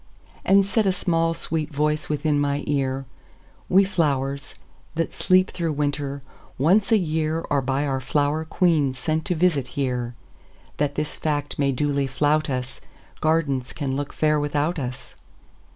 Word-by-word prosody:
And 195 0 +5
said 205 +1 +1
a - - +4
small, 165 -2 +1
sweet 155 -2 -2
voice 150 +1 0
within 150 0 +1
my 145 0 0
ear:"We 135 +7 -1
flowers, 140 -7 -1 0.4
that 165 0 -1
sleep 185 +1 +3
through 165 -3 -2
winter, 145 -1 -2 0.3
once 190 - +3
a 225 - +7
yearAre 155 -4 0
by 135 +3 0
our 135 -2 -1
flower 145 +4 0
queen 160 -5 +2
sent 155 +4 -1
to 180 - 0
visit 155 -6 +2
here, 125 -3 -1 0.6
That 145 -1 0
this 150 - -3
fact 145 -2 -2
may 140 -1 +3
duly 140 +1 0
flout 150 +3 +1
us,—Gardens 135 +2 -2
can 135 -3 -2
look 145 0 -3
fair 155 -1 +2
without 150 +3 0
us. 130 -1 -6
150 Hz, 140 wpm, -24 LUFS, 140-160 Hz, 0.6 s, a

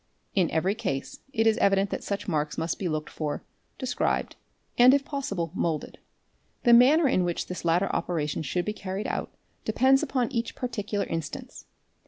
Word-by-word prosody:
In 185 -5 +2
every 185 +5 +1
case 175 -12 -4
it 225 -4 +1
is 220 -1 +4
evident 195 0 +3
that - - -3
such 200 -1 -3
marks 150 -4 -1
must 165 0 -2
be 185 - -1
looked 155 -1 -3
for, 150 -2 -3 0.3
described, 250 -1 -1 0.4
and, 250 +3 +7
if 280 -1 0
possible, 200 - -3
moulded. 160 -3 -2 0.6
The 240 - +6
manner 280 +6 +7
in 185 -8 +2
which 175 -1 -1
this 180 - -6
latter 175 +3 +2
operation 155 -4 -1
should 175 +4 -1
be 210 - -1
carried 195 0 -5
out - - -3 0.3
depends 260 +5 +4
upon 255 -3 0
each 235 -2 -2
particular 210 -5 -2
instance. 165 -3 -6
200 Hz, 170 wpm, -27 LUFS, 165-240 Hz, 0.6 s, and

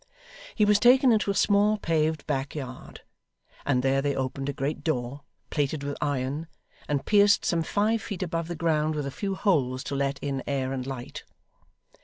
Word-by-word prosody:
He 210 - +4
was 205 0 +4
taken 255 +3 +6
into 215 -2 +2
a 200 - 0
small 205 +2 +3
paved 160 -4 0
back 135 +2 -2
yard, 130 -3 -8 0.7
and 125 -3 +2
there 135 +1 +2
they 140 -1 0
opened 135 +1 -3
a - - +1
great 140 +2 -3
door, 135 -2 -2 0.3
plated 145 0 -1
with 145 0 -3
iron, 145 +2 -2 0.4
and 145 -2 -1
pierced 205 -1 +4
some 170 -2 +1
five 215 +6 +1
feet 200 -2 -4
above 165 -2 -3
the 175 - -4
ground 155 -1 +1
with 150 -2 -2
a 140 - -4
few 195 +6 -3
holes 130 -11 +1
to 140 - -4
let 140 0 0
in 140 -2 -3
air 135 -2 -1
and 130 -1 -4
light. 130 -3 -6
150 Hz, 185 wpm, -27 LUFS, 135-195 Hz, 0.7 s, taken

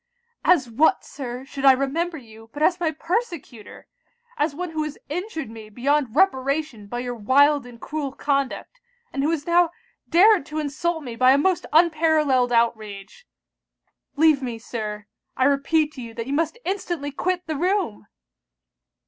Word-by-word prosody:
'As 325 -8 +4
what, 240 +8 +2
Sir, 255 -2 -7
should 275 0 -7
I 270 -1 +8
remember 315 +6 -1
you, 225 -3 -14
but 295 - -2
as 350 +2 +3
my 340 -2 +1
persecutor? 330 - -4 0.5
as 295 -5 -1
one 355 +1 -4
who 310 -1 -2
has 305 -1 -6
injured 330 -1 -4
me 220 -1 -10
beyond 265 +2 0
reparation 275 - +1
by 240 +3 -4
your 245 0 -4
wild 275 +5 +3
and 240 -1 -13
cruel 295 0 -4
conduct; 280 - -2 0.3
and 275 - -1
who 290 - +1
has 325 -3 -1
now 345 0 +4 0.4
dared 390 +2 +6
to 305 - -6
insult 310 +2 -2
me 240 -4 -6
by 255 +2 +5
a - - +4
most 360 +4 +1
unparallelled 310 -6 +3
outrage. 230 - -1 0.9
Leave 305 -2 +4
me, 240 -3 -4
Sir! 215 -3 -6 0.3
I - - +2
repeat 290 +3 +2
to 260 - -8
you 230 -1 -9
that 230 -1 -4
you 270 - -4
must 325 +7 0
instantly 345 -6 -3
quit 360 +5 -2
the 315 - -3
room!' 350 - -1
285 Hz, 165 wpm, -23 LUFS, 245-330 Hz, 0.9 s, I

